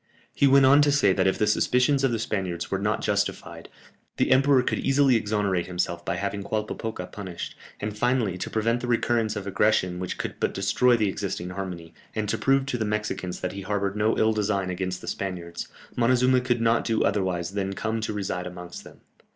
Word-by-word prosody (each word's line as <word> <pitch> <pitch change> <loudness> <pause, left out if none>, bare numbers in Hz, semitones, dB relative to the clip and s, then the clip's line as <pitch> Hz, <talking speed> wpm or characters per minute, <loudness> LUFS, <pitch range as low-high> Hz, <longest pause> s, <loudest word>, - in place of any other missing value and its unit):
He 140 - +3
went 135 0 +6
on 140 +2 +7
to 145 0 +4
say 140 -10 +4
that - - +2
if 95 - +1
the 105 - +2
suspicions 125 +6 +2
of 135 - +3
the 115 - 0
Spaniards 95 -6 -3
were 95 - 0
not 105 +1 -1
justified, 105 0 -2 0.5
the - - +1
emperor 135 0 +5
could - - -1
easily 135 -1 +3
exonerate 105 -5 0
himself 90 -1 -2
by - - -2
having 100 0 -3
Qualpopoca 110 -1 -3
punished, 95 -4 -6 0.3
and 105 0 -4
finally, 120 -4 +1
to 90 - -5
prevent 115 +2 0
the 125 - -4
recurrence 115 -2 +1
of 100 -2 -5
aggressions 95 -2 +1
which 90 - -4
could - - -5
but - - -1
destroy 120 +5 +3
the 110 -2 +1
existing 95 -2 -3
harmony, 90 -3 -6 0.2
and 110 -1 -1
to - - -1
prove 135 0 +2
to 125 -3 -3
the - - +1
Mexicans 105 -4 -3
that 90 - -2
he 100 - -6
harboured 100 0 -2
no 105 +1 +1
ill 110 0 +3
design 100 -3 0
against 90 0 -3
the - - -10
Spaniards, 85 -3 -4 0.3
Montezuma 125 +1 +3
could 120 -2 0
not 115 0 +3
do 115 -2 +1
otherwise 95 -3 0
than 100 -1 -2
come 110 +2 -2
to 110 - -2
reside 95 -3 -3
amongst 90 -1 -9
them. - - -15
105 Hz, 205 wpm, -25 LUFS, 95-120 Hz, 0.5 s, on